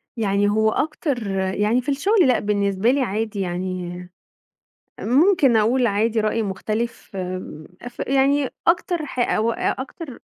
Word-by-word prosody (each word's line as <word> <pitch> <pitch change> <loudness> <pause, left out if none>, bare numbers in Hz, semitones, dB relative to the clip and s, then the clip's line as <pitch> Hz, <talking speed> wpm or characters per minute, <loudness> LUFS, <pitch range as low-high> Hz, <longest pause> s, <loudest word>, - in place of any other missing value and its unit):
يعني 205 -3 +1
هو 220 +1 +2
أكتر 285 - -2
يعني 205 +5 +1
في 250 - -5
الشُغل 360 +6 +3
لأ، 250 - +3
بالنسبة 200 +1 +1
لي 280 +1 +1
عادي 215 -2 -2
يعني 180 -1 -4 0.9
ممكن 280 - +3
أقول 240 +3 +2
عادي 220 +2 +1
رأي 215 +1 0
مُختلف 215 +3 -4
آمم 185 -4 -6 0.2
ف 240 - -27
يعني 275 0 +2 0.2
أكتر 345 -1 +1
ح 265 - -7
أو 230 -1 +1
أ 245 - -2
أكتر 275 0 -9
225 Hz, 140 wpm, -22 LUFS, 200-265 Hz, 0.9 s, الشُغل